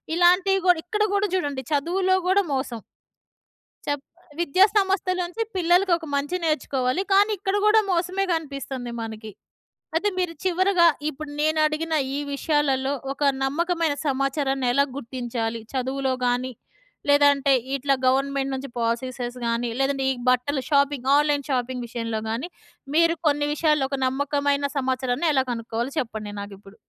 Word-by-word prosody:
ఇలాంటియ్యి 365 +2 +4
గూడా 360 -2 +5
ఇక్కడ 425 +3 0
గూడా 405 +1 +2
చూడండి 285 -7 -2
చదువులో 365 +6 +2
కూడా 395 +2 +4
మోసం. 250 -4 -3 1.1
చెప్ 290 -1 -1 0.4
విద్యా 345 +3 +5
సంస్థల 385 -2 +1
నుంచి 355 +6 -5
పిల్లలకొక 350 -1 +2
మంచి 290 +5 -1
నేర్చుకోవాలి. 270 -1 0
కానీ 405 +2 +5
ఇక్కడ 385 +1 -1
గుడా 435 +1 +6
మోసమే 365 +2 0
కనిపిస్తుంది 275 -6 -4
మనకి. 220 -1 -7 0.6
అయితే 405 +6 +2
మీరు 360 -2 -1
చివరగా 370 -1 +3 0.2
ఇప్పుడు 300 0 -8
నేనడిగిన 310 +1 +1 0.2
ఈ - - -1
విషయాలలో 280 -2 +1 0.2
ఒక 290 - -4 0.2
నమ్మకమైన 330 +2 0
సమాచారాన్ని 275 -1 0
ఎలా 280 +2 +4
గుర్తించాలి? 235 -3 -4
చదువులో 265 +1 -1
గాని 245 +1 0 0.6
లేదంటే 285 -1 +4 0.2
ఇట్లా 275 +1 +1
గవర్నమెంట్ 275 +1 +1
నుంచి 265 +1 -5
పాలిసీసెస్ 240 +1 -2
గాని 235 +1 0
లేదంటే 270 0 +1
ఈ - - +1 0.2
బట్టలు 255 +3 +1
షాపింగ్ 280 -3 +2
ఆన్‌లైన్ 290 -1 +1
షాపింగ్ 250 -1 -2
విషయంలో 230 -1 -3
గాని 235 +10 -3 0.5
మీరు 335 +1 +4
కొన్ని 290 0 +2
విషయాల్లో 300 -3 +2
ఒక 275 - -2
నమ్మకమైన 285 +1 0
సమాచారాన్ని 260 +2 0
ఎలా 265 -2 +3
కనుక్కోవాలో 230 +2 -3
చెప్పండి 220 -4 -5
నాకిప్పుడు? 200 0 -11
280 Hz, 130 wpm, -24 LUFS, 255-335 Hz, 1.1 s, గుడా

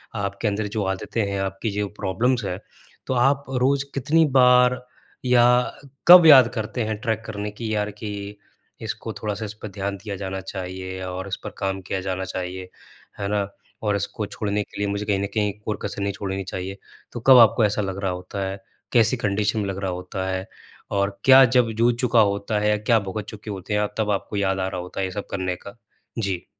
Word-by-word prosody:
आपके 100 +1 -2
अंदर 105 +1 -1
जो 105 0 -2
आदतें 105 +4 -3
हैं, 100 - -2
आपकी 95 +3 -3
जो 105 0 -1
प्रॉब्लम्स 115 +6 0
हैं, 90 0 -3 0.5
तो - - 0
आप 135 +3 +3
रोज़ 135 +2 +1
कितनी 155 +4 +3
बार 125 0 +5 0.4
या 125 -1 +5 0.6
कब 175 -1 +11
याद 135 -6 +9
करते 110 +2 -2
हैं 110 0 -2
ट्रैक 110 -3 -1
करने 105 -1 -4
की 110 +1 -4
यार 105 0 -1
कि 105 -1 -7 0.4
इसको - - -5
थोड़ा-सा 105 0 -4
इस 105 - -6
पे - - -5
ध्यान 100 0 -4
दिया 100 +1 -6
जाना 95 0 -4
चाहिए 95 0 -6
और 95 +1 -5
इस 95 - -2
पर - - -4
काम 95 -1 -2
किया 95 +1 -3
जाना 95 0 -3
चाहिए। 95 0 -5 0.5
है 100 - -2
ना? 100 -1 0 0.3
और 105 -2 +1
इसको 100 +1 -3
छोड़ने 105 0 -2
के - - -14
लिए 100 - 0
मुझे 100 +1 -2
कहीं 100 -2 +1
न 100 - -1
कहीं 105 -2 0
कोई 105 - -2
कसर 100 - -4
नहीं 100 0 -1
छोड़नी 95 0 -4
चाहिए। 95 +1 -5 0.4
तो - - -4
कब 130 -2 +10
आपको 115 -1 +6
ऐसा 105 +1 0
लग 95 -1 -3
रहा 95 - +1
होता 90 +2 -5
है? 95 +1 -5 0.3
कैसी 115 0 +4
कंडीशन 105 0 0
में 105 - -1
लग 95 - -4
रहा 95 - 0
होता 95 +1 -4
है, 95 0 -2 0.5
और 100 0 -1
क्या 135 0 +9
जब 125 -2 +3
जूझ 120 +1 +4
चुका 125 -2 +3
होता 100 0 +1
है 105 0 +1
या 105 - +3
क्या 110 +2 +3
भुगत 100 +1 -5
चुके 105 0 -8
होते 100 +1 -5
हैं 105 - +2
आप 105 0 -2
तब 105 -1 +1
आपको 100 +1 -3
याद 95 -1 +1
आ 95 - 0
रहा 95 -2 -4
होता 90 +2 -8
है 95 - +1
ये 95 - -4
सब 100 +2 -5
करने 95 -1 -2
का? 100 +5 -12 0.4
जी। 95 -5 -2
100 Hz, 215 wpm, -23 LUFS, 95-110 Hz, 0.6 s, कब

